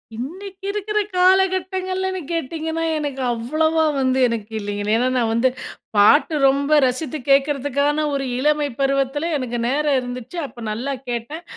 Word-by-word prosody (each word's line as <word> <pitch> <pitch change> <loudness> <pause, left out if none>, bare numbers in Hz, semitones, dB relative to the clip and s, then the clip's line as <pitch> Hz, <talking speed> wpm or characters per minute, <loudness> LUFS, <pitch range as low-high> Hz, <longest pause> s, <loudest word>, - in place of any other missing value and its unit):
இன்னைக்கு 375 - -7
இருக்கிற 420 +1 -1 0.2
காலகட்டங்களில்ன்னு 375 0 +1
கேட்டீங்கன்னா, 325 +1 -3 0.2
எனக்கு 285 -3 -4
அவ்வளோவா 315 +7 +1 0.2
வந்து 260 0 +1
எனக்கு 230 -2 -4
இல்லைங்க. 205 0 -4
ஏன்னா, 245 +3 +2
நான் 230 -2 +1
வந்து 235 +3 +3 0.5
பாட்டு 210 +10 +5
ரொம்ப 280 +3 +3
ரசித்து 260 +4 -2
கேட்கறதுக்கான, 285 +1 +2
ஒரு 275 -1 -1
இளமை 295 +2 +2
பருவத்திலே 275 +3 0
எனக்கு 245 -2 -3
நேரம் 285 +1 +1
இருந்துச்சு. 250 +6 -7
அப்போ 240 - -13
நல்லா 250 +6 -3 0.2
கேட்டேன். 245 +8 -4
285 Hz, 130 wpm, -21 LUFS, 250-330 Hz, 0.5 s, பாட்டு